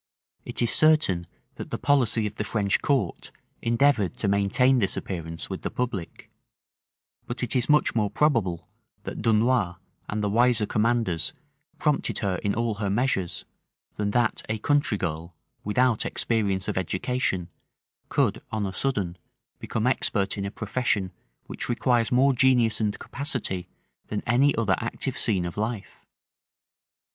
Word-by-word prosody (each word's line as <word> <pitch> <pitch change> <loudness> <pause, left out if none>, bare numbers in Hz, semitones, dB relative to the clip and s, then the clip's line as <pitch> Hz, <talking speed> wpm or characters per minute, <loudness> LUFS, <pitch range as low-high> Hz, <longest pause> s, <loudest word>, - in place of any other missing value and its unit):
It - - -1
is 120 - +2
certain 155 - +4 0.3
that - - -7
the - - -3
policy 125 -6 +2
of 105 - -3
the - - -1
French 105 -2 0
court 130 - -1 0.3
endeavored 115 - +2
to 105 - -1
maintain 100 +7 +3
this 100 -4 +1
appearance 80 -3 -5
with - - -6
the - - -3
public: 115 -9 -5 1.0
but 125 +1 -3
it 125 +2 -1
is 125 +1 +1
much 150 0 +4
more 105 -3 +1
probable, 95 - +1 0.4
that - - -6
Dunois 110 -4 +2 0.3
and 105 0 -2
the 105 - +1
wiser 120 0 +3
commanders 110 -6 0 0.4
prompted 150 -2 0
her 95 -3 -1
in 100 +2 -1
all 115 -1 0
her 100 - 0
measures, 95 -5 0 0.5
than 105 -1 -2
that 120 +1 +1
a 110 - 0
country 145 -1 +1
girl, 85 -1 -4 0.3
without 120 +2 +2
experience 100 -5 0
of - - 0
education, 95 -1 -1 0.6
could - - +1
on 110 -2 -1
a 95 - -4
sudden 95 -7 -1 0.4
become 110 - -2
expert 100 -6 +1
in 100 - -3
a - - -2
profession 105 -3 -1 0.3
which - - -6
requires 120 -1 +1
more 135 +2 +4
genius 125 -3 +3
and 105 -1 0
capacity 115 - -3 0.4
than 105 - -3
any 135 +5 +3
other 105 -5 +2
active 125 +3 -3
scene 100 -9 +2
of 85 - -6
life. 110 0 -4
110 Hz, 150 wpm, -26 LUFS, 95-125 Hz, 1.0 s, certain